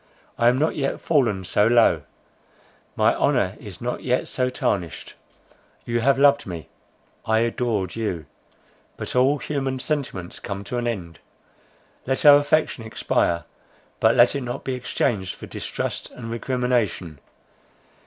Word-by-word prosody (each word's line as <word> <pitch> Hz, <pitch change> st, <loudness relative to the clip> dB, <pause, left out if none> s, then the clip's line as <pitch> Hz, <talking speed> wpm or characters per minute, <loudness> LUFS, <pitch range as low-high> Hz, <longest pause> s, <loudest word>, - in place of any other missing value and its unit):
I 120 Hz, -, +3 dB
am 125 Hz, +1 st, +4 dB
not 155 Hz, +4 st, +1 dB
yet 135 Hz, -2 st, -1 dB
fallen 120 Hz, -, +1 dB
so 105 Hz, +3 st, +2 dB
low; 115 Hz, -9 st, +4 dB, 0.9 s
my -, -, +4 dB
honour 95 Hz, +2 st, +1 dB
is 100 Hz, -5 st, -10 dB
not 125 Hz, +1 st, -3 dB
yet 125 Hz, 0 st, 0 dB
so 125 Hz, -1 st, -1 dB
tarnished. 90 Hz, -, -2 dB, 0.7 s
You 120 Hz, 0 st, 0 dB
have 135 Hz, +3 st, +3 dB
loved 140 Hz, -2 st, +4 dB
me; 85 Hz, -4 st, -7 dB, 0.5 s
I 110 Hz, 0 st, +2 dB
adored 115 Hz, -5 st, -1 dB
you. 95 Hz, -9 st, -3 dB, 0.7 s
But -, -, -6 dB
all 130 Hz, +4 st, +4 dB
human 135 Hz, -1 st, -2 dB
sentiments 130 Hz, -, -3 dB
come 100 Hz, -1 st, -5 dB
to 120 Hz, +5 st, -3 dB
an 120 Hz, -, -2 dB
end. 90 Hz, -8 st, -4 dB, 0.9 s
Let 135 Hz, +3 st, -1 dB
our 145 Hz, -1 st, +10 dB
affection 145 Hz, -4 st, +1 dB
expire—but 85 Hz, -6 st, -1 dB
let -, -, +5 dB
it 140 Hz, -, -1 dB
not 120 Hz, -1 st, -5 dB
be 130 Hz, -, -2 dB
exchanged 110 Hz, -6 st, -1 dB
for -, -, -9 dB
distrust -, -, -4 dB
and 115 Hz, -2 st, -8 dB
recrimination. 115 Hz, -, -1 dB
120 Hz, 140 wpm, -23 LUFS, 100-130 Hz, 0.9 s, our